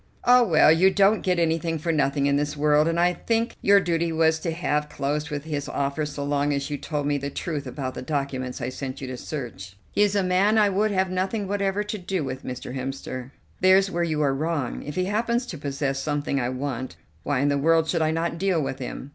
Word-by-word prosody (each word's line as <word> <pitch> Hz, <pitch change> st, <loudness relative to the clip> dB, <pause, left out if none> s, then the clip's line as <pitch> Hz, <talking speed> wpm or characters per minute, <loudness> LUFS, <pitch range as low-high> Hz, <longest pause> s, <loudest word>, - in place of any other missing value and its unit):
"Ah, 250 Hz, 0 st, +7 dB
well, 160 Hz, -8 st, +5 dB
you 175 Hz, +4 st, +5 dB
don't 200 Hz, +2 st, +3 dB
get 180 Hz, -1 st, +1 dB
anything 165 Hz, 0 st, 0 dB
for 165 Hz, +2 st, -1 dB
nothing 140 Hz, -2 st, +1 dB
in 140 Hz, 0 st, +3 dB
this 150 Hz, +1 st, -1 dB
world, 150 Hz, +1 st, +3 dB
and 165 Hz, 0 st, 0 dB
I 175 Hz, +1 st, +3 dB
think 230 Hz, +5 st, -1 dB
your 200 Hz, 0 st, +6 dB
duty 170 Hz, -2 st, 0 dB
was 160 Hz, 0 st, +2 dB
to 170 Hz, -, -3 dB
have 150 Hz, -3 st, -1 dB
closed 145 Hz, +1 st, -2 dB
with 145 Hz, -2 st, -4 dB
his 150 Hz, -3 st, -4 dB
offer 140 Hz, +2 st, -1 dB
so 145 Hz, -1 st, -5 dB
long 145 Hz, 0 st, 0 dB
as 140 Hz, +1 st, -3 dB
you 145 Hz, -, -1 dB
told 150 Hz, -2 st, -3 dB
me 145 Hz, 0 st, +1 dB
the 140 Hz, +1 st, -4 dB
truth 145 Hz, -2 st, -4 dB
about 130 Hz, 0 st, -4 dB
the -, -, -6 dB
documents 130 Hz, -2 st, -3 dB
I 120 Hz, -, -2 dB
sent 130 Hz, 0 st, -6 dB
you 135 Hz, -, -5 dB
to 130 Hz, -, -4 dB
search." 105 Hz, -9 st, -7 dB
"He -, -, 0 dB
is 205 Hz, -1 st, +3 dB
a 200 Hz, -, +2 dB
man 190 Hz, +4 st, +3 dB
I 210 Hz, -2 st, +5 dB
would 205 Hz, +3 st, +1 dB
have 190 Hz, -2 st, 0 dB
nothing 190 Hz, +3 st, -1 dB
whatever 200 Hz, 0 st, 0 dB
to 210 Hz, +1 st, -4 dB
do 185 Hz, -2 st, -2 dB
with, 130 Hz, 0 st, -5 dB
Mr. 125 Hz, 0 st, -6 dB
Hemster." 130 Hz, -1 st, -5 dB, 0.3 s
"There's 190 Hz, +1 st, +5 dB
where 175 Hz, -, -1 dB
you 155 Hz, -3 st, 0 dB
are 140 Hz, -2 st, +2 dB
wrong. 145 Hz, -2 st, -2 dB
If 150 Hz, -, -7 dB
he 185 Hz, -, 0 dB
happens 235 Hz, +5 st, 0 dB
to 175 Hz, -, -7 dB
possess 140 Hz, -1 st, -2 dB
something 145 Hz, -1 st, -1 dB
I 120 Hz, -, -1 dB
want, 130 Hz, -4 st, -4 dB, 0.3 s
why 140 Hz, -2 st, 0 dB
in 145 Hz, -, +2 dB
the 140 Hz, 0 st, +1 dB
world 160 Hz, +2 st, +3 dB
should 170 Hz, 0 st, 0 dB
I 155 Hz, -, +2 dB
not 165 Hz, +1 st, -1 dB
deal 190 Hz, -3 st, +1 dB
with 135 Hz, -2 st, -3 dB
him. 130 Hz, +1 st, -6 dB
155 Hz, 240 wpm, -25 LUFS, 140-185 Hz, 0.3 s, Ah